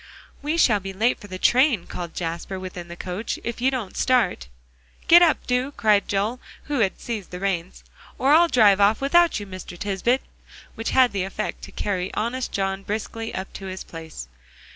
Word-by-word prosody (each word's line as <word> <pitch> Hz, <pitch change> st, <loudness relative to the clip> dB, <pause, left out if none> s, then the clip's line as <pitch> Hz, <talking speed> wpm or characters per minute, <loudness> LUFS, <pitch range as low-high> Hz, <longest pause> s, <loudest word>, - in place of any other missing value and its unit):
"We 300 Hz, +3 st, -1 dB
shall 225 Hz, -10 st, +4 dB
be 195 Hz, 0 st, -7 dB
late 225 Hz, +6 st, +1 dB
for 205 Hz, -, -11 dB
the 185 Hz, -1 st, -6 dB
train," 250 Hz, -, +3 dB
called 175 Hz, -2 st, -7 dB
Jasper 170 Hz, +2 st, -4 dB
within 180 Hz, -2 st, -7 dB
the 170 Hz, -, -8 dB
coach, 185 Hz, +5 st, -4 dB
"if 235 Hz, 0 st, -4 dB
you 260 Hz, -, +4 dB
don't 245 Hz, -8 st, -4 dB
start." 240 Hz, -, +1 dB, 0.6 s
"Get 345 Hz, +1 st, +9 dB
up, 335 Hz, -3 st, +3 dB
do!" 250 Hz, +3 st, 0 dB
cried 205 Hz, -2 st, +2 dB
Joel, 205 Hz, +5 st, -1 dB, 0.2 s
who 290 Hz, -3 st, -2 dB
had 195 Hz, -4 st, +1 dB
seized 220 Hz, -6 st, -5 dB
the 180 Hz, -, -7 dB
reins, 185 Hz, -2 st, -3 dB, 0.3 s
"or 270 Hz, -, +2 dB
I'll 340 Hz, +2 st, +6 dB
drive 205 Hz, -8 st, +5 dB
off 205 Hz, +2 st, +4 dB
without 335 Hz, +3 st, +3 dB
you, 205 Hz, -, -6 dB
Mr. 185 Hz, -2 st, -9 dB
Tisbett," 205 Hz, +7 st, 0 dB, 0.5 s
which 225 Hz, -, -4 dB
had 255 Hz, -2 st, +4 dB
the 200 Hz, -, -2 dB
effect 195 Hz, +3 st, -4 dB
to -, -, -13 dB
carry 185 Hz, -3 st, -2 dB
honest 245 Hz, +4 st, -2 dB
John 195 Hz, 0 st, -1 dB
briskly 220 Hz, +2 st, -4 dB
up 190 Hz, +1 st, -5 dB
to 195 Hz, -, -7 dB
his 190 Hz, 0 st, -6 dB
place. 160 Hz, -, -9 dB
205 Hz, 190 wpm, -23 LUFS, 190-250 Hz, 0.6 s, Get